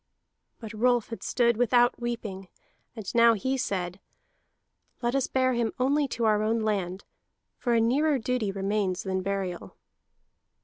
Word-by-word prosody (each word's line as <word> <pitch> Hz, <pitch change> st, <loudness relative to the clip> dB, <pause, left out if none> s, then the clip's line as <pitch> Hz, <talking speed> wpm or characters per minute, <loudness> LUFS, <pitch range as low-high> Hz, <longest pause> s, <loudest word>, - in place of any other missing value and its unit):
But 220 Hz, -1 st, -8 dB
Rolf 240 Hz, +1 st, +2 dB
had 230 Hz, -, -7 dB
stood 235 Hz, -2 st, +1 dB
without 245 Hz, 0 st, +3 dB
weeping, 215 Hz, -5 st, -4 dB, 0.5 s
and 220 Hz, -3 st, -7 dB
now 235 Hz, -1 st, +6 dB
he 260 Hz, +6 st, -1 dB
said: 185 Hz, -7 st, -3 dB, 1.0 s
"Let 240 Hz, +1 st, +1 dB
us 275 Hz, -1 st, +1 dB
bear 255 Hz, -1 st, +1 dB
him 235 Hz, -2 st, -1 dB
only 280 Hz, +3 st, +2 dB
to 235 Hz, -2 st, -2 dB
our 210 Hz, -1 st, +3 dB
own 225 Hz, +1 st, +1 dB
land, 195 Hz, -3 st, -2 dB, 0.5 s
for 240 Hz, -2 st, +1 dB
a -, -, +4 dB
nearer 280 Hz, +6 st, +2 dB
duty 245 Hz, -4 st, -1 dB
remains 195 Hz, -1 st, -1 dB
than 190 Hz, -1 st, -2 dB
burial." 190 Hz, -2 st, -4 dB
230 Hz, 145 wpm, -27 LUFS, 200-245 Hz, 1.0 s, now